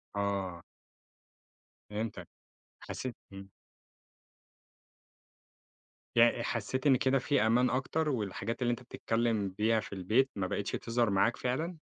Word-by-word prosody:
آه. 100 -4 -2 1.3
فهمتك. 105 +1 -4 0.5
حسّيت 130 -3 -5 0.2
إمم. 95 0 -9 2.7
يع 120 0 +5
حسّيت 130 +3 -1
إن 135 - +7
كده 130 +1 +2
في 140 +2 +1
أمان 120 +3 +4
أكتَر 150 +5 0
والحاجات 115 -1 -3
اللي 120 - +2
أنت 120 - -3
بتتكلّم 115 -4 0
بيها 110 +4 +2
في 100 - -7
البيت، 110 +8 +2
ما 100 -2 -1
بقيتش 100 +2 -2
تظهَر 115 -1 0
معاك 100 +5 +2
فعلًا؟ 160 +8 -2
115 Hz, 115 wpm, -32 LUFS, 100-130 Hz, 2.7 s, إن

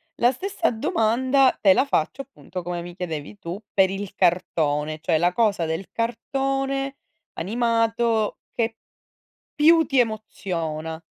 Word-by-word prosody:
La 245 -4 +4
stessa 350 +5 -1
domanda 260 0 +2
te 195 - +5
la 265 - +3
faccio, 265 - 0
appunto, 185 -9 -8
come 175 0 -4
mi 175 0 -9
chiedevi 175 +1 -5
tu 175 +3 -6
per 190 -1 +4
il 195 0 -5
cartone, 155 -5 +1
cioè 160 0 +1
la 175 +2 +2
cosa 200 -4 +1
del 160 +4 -3
cartone 270 +3 -2 0.4
animato 230 +2 +1
che 225 -1 -1 0.8
più 320 +1 +5
ti 265 -1 +2
emoziona. 165 -8 -2
215 Hz, 130 wpm, -24 LUFS, 175-260 Hz, 0.8 s, te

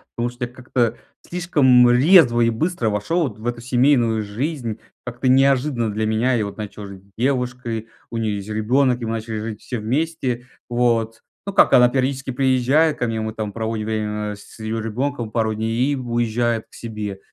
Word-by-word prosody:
Потому 120 +1 -1
что 125 0 -4
я 120 - -11
как-то 120 -2 -1 0.3
слишком 140 -9 +4
резво 125 -2 +6
и 115 - +4
быстро 120 0 -1
вошел 105 - 0
вот 110 - -9
в 110 - -11
эту 120 -1 -2
семейную 120 -3 +2
жизнь, 115 +1 -4 0.3
как-то 125 +1 -3
неожиданно 130 -3 +3
для 110 +1 -1
меня. 110 +4 +1
Я 110 -4 0
вот 100 - -9
начал 105 -1 -7
жить 95 -1 -11
с 100 - -27
девушкой, 125 -4 -1 0.2
у 115 - -5
нее 110 -2 -1
есть 100 +1 -7
ребенок, 125 +4 +2
и 120 - -4
мы 110 - -2
начали 115 0 -4
жить 110 -1 -6
все 125 - -5
вместе. 130 +1 -2 0.2
Вот. 115 -2 +1 0.2
Ну 200 - -4
как, - - +5
она 125 0 +7
периодически 130 +1 -1
приезжает 135 +4 +2
ко 125 - -1
мне, 115 -1 -2
мы 110 0 -3
там 105 -2 -4
проводим 110 -1 -3
время 105 -1 -2
с 100 - -15
её 110 0 -3
ребенком 120 +2 -3
пару 110 0 0
дней, 115 +5 0
и - - 0
уезжает 120 -2 -1
к - - -31
себе. 105 -4 -6
120 Hz, 190 wpm, -21 LUFS, 110-130 Hz, 0.3 s, она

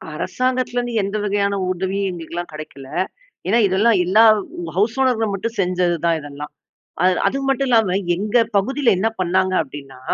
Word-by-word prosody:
அரசாங்கத்துலருந்து 250 +3 -1
எந்த 200 +2 -3
வகையான 200 0 0 0.2
உதவியும் 190 +2 -2
எங்களுக்கெல்லாம் 175 0 -6
கெடைக்கல. 140 -3 -9 0.6
ஏன்னா 225 +5 +3
இதெல்லாம் 205 +4 +3
எல்லா 215 +6 +5 0.5
ஹவுஸ் 220 +6 +1
ஓனர்கள் 225 -5 +1
மட்டும் 230 +4 -4
செஞ்சது 180 -1 +1
தான் 165 -1 +2
இதெல்லாம். 145 0 -8 0.5
அ 180 - +4 0.2
அது 270 - 0
மட்டும் 270 0 +1
இல்லாம 215 -6 +3 0.2
எங்க 210 +6 0 0.2
பகுதில 260 +3 +2
என்ன 215 +4 +1
பண்ணாங்கங்க 185 +1 +1
அப்டின்னா, 135 -2 -11
195 Hz, 140 wpm, -20 LUFS, 175-230 Hz, 0.6 s, எல்லா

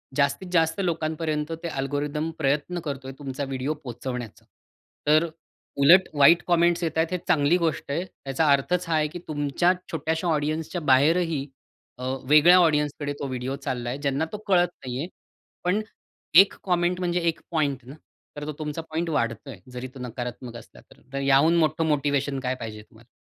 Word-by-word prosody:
जास्तीत 140 +6 +1
जास्त 160 0 +2
लोकांपर्यंत 160 -3 -2
ते - - -2
अल्गोरिदम 145 +1 -2
प्रयत्न 150 +4 0
करतोय, 135 -2 -5
तुमचा 140 -1 -4
व्हिडिओ 135 +2 -2
पोहोचवण्याचा. 125 -4 -7 0.6
तर 155 +3 +4 0.5
उलट, 170 +7 +6
वाईट 155 +4 +6
कॉमेंट्स 175 0 +3
येत 160 -1 -2
आहेत, 160 +1 +3
हे 180 - 0
चांगली 160 0 +3
गोष्ट 165 -4 -2
आहे. 170 +6 -1 0.2
याचा 135 +4 +1
अर्थच 175 +6 +1
हा 165 - +2
आहे, 155 -1 +2
की 165 +4 -8
तुमच्या 150 +4 +1 0.2
छोट्याश्या 160 +2 -1
ऑडियन्सच्या 155 +3 -1
बाहेरही 155 +2 +3 0.5
अ, 125 - -8 0.3
वेगळ्या 155 +5 +7
ऑडियन्सकडे 150 -3 +1
तो 140 - -3
व्हिडिओ 130 +1 -3
चालला 120 -1 -3
आहे, 125 - -3
ज्यांना 140 +2 0
तो 210 - -4
कळत 180 -2 +4 0.2
नाही 125 -1 -4
आहे. 160 - -3 0.6
पण 190 +5 +1 0.6
1 195 - 0
कॉमेंट, 180 -1 +1
म्हणजे 180 -1 0
1 165 - -4
पॉइंट 140 -6 -1
ना, 135 +3 -10 0.4
तर 145 0 -6
तो 155 - -4
तुमचा 150 +1 -4
पॉइंट 165 +2 -2
वाढतोय. 115 - -2
जरी 125 +1 -6
तो - - -9
नकारात्मक 125 0 -6
असला - - -15
तर. - - -22
तर 140 - -2
याहून 140 +4 +4
मोठं 160 0 +2
मोटिव्हेशन 140 -2 0
काय 130 0 -2
पाहिजे 110 -3 -7
तुम्हाला? 115 +2 -21
150 Hz, 170 wpm, -25 LUFS, 135-165 Hz, 0.6 s, वेगळ्या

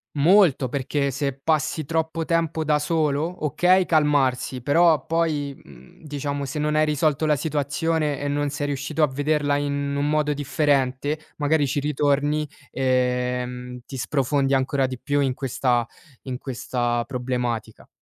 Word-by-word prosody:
Molto, 150 -4 +4
perché 140 +1 -1
se 140 +1 -2
passi 155 +1 0
troppo 160 +1 -1
tempo 165 -1 0
da 150 -1 +2
solo, 155 +1 -1
okay 180 +5 +3
calmarsi, 135 -5 +1
però 165 +3 +4
poi, 155 -4 0
mhmm, 65 -2 -17
diciamo 145 -1 -3
se 135 +3 -5
non 150 0 0
hai 155 0 +3
risolto 150 0 +1
la 150 - +4
situazione 150 +1 -1
e 145 - -3
non 145 0 0
sei 145 0 -3
riuscito 145 +3 -1
a 150 - +5
vederla 145 +1 0
in 140 0 -2
un 145 +1 0
modo 150 -1 +1
differente, 145 0 0 0.2
magari 145 0 +2
ci 140 - -1
ritorni, 145 +1 0 0.2
ehm, 125 -1 -1
ti 135 - -8
sprofondi 135 +1 +1
ancora 135 0 +1
di 130 -1 -6
più 145 +3 -1
in 130 -2 0
questa 125 -2 0 0.4
in 125 -2 -5
questa 120 -2 -2
problematica. 125 -4 -3
145 Hz, 145 wpm, -23 LUFS, 130-155 Hz, 0.4 s, a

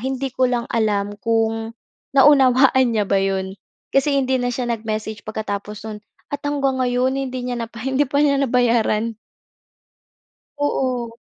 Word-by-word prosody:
hindi 265 +2 -2
ko 260 - +2
lang 240 -1 -1
alam 205 -3 0
kung 225 0 0 0.4
naunawaan 265 -2 +5
niya 210 -2 +1
ba 200 - +2
'yon 190 0 -2 0.4
kasi, 280 +1 +3
hindi 260 -1 +1
na 245 - 0
siya 245 0 -3
nag-message 215 -1 -4
pagkatapos 210 0 -5
no'n 210 -1 -7 0.3
at 285 - -3
hanggang 275 -2 0
ngayon, 250 +2 +1
hindi 260 -1 -3
niya 245 - -2
na 230 - -3
pa 230 - -10
hindi 270 +2 +2
pa 285 +1 +1
niya 285 -1 +3
nabayaran. 230 -3 +1 1.4
Oo. 255 -5 -1
240 Hz, 150 wpm, -21 LUFS, 220-265 Hz, 1.4 s, naunawaan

